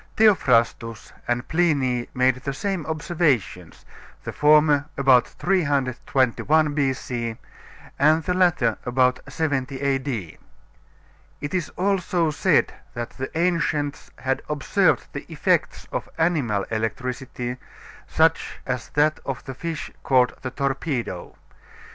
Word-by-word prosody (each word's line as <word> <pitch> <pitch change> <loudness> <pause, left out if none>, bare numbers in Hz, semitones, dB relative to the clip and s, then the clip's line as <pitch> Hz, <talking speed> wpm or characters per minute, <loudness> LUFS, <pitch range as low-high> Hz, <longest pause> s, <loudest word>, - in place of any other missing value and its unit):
Theophrastus 120 - +2
and 120 0 -1
Pliny 140 -8 +1
made 130 0 +3
the 135 +1 -5
same 190 -2 -3
observations; 150 - -1 0.4
the - - -5
former 150 -1 +4
about 135 -3 +5
321 145 -2 +1
B.C., 125 -5 -2 0.6
and 155 +3 +4
the 180 - 0
latter 175 - +2
about 125 0 +2
70 135 -4 -1
A.D. 135 - -2 1.0
It 145 +3 -5
is 180 -4 -1
also 180 -3 +1
said - - +2 0.2
that 120 0 -4
the 130 0 -5
ancients 165 -4 0
had 130 +1 -1
observed 150 -3 +2
the - - -7
effects - - 0
of - - -4
animal 145 - +1
electricity, 125 +2 -3 0.5
such 160 0 +1
as 125 -3 -3
that 150 +1 +3
of 135 -2 -5
the 130 - -6
fish 165 +4 -5
called 125 -2 +3
the 130 - -3
torpedo. 135 - -3
140 Hz, 110 wpm, -23 LUFS, 125-160 Hz, 1.0 s, about